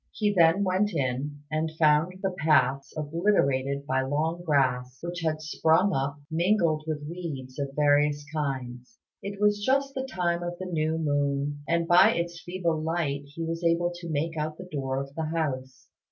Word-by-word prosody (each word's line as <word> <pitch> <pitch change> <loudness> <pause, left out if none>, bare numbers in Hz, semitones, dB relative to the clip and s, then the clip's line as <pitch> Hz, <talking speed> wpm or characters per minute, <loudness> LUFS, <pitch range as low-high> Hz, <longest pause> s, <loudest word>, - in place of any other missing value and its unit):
He 210 -2 0
then 170 +1 +5
went 190 +1 +1
in, 140 +1 -2
and 155 +1 -1
found 155 +3 +3
the 190 - +1
paths 150 -5 +2
obliterated 140 -4 +1
by 130 -1 +1
long 155 +5 -1
grass, 130 -5 +1
which 175 0 -4
had 155 -1 -1
sprung 160 +5 +2
up, 140 +1 -1
mingled 165 -2 +2
with 150 -2 -3
weeds 150 -7 -6
of 140 -1 -3
various 145 0 +3
kinds. 130 - -4 0.2
It 200 0 -6
was 205 0 +2
just 275 +3 +1
the 265 -1 -3
time 175 -3 0
of 175 0 -4
the 185 - -6
new 160 -2 -1
moon, 145 -1 0
and 170 0 +1
by 175 +1 +6
its 170 0 -3
feeble 175 -3 -2
light 155 -4 -1
he 150 +4 -6
was 165 +1 -3
able 170 +1 +2
to 175 -1 -8
make 160 +2 -1
out 155 0 -3
the 180 - -9
door 135 -2 -2
of 140 0 -6
the 160 +1 -3
house. 130 -5 -3
155 Hz, 175 wpm, -27 LUFS, 140-175 Hz, 0.2 s, by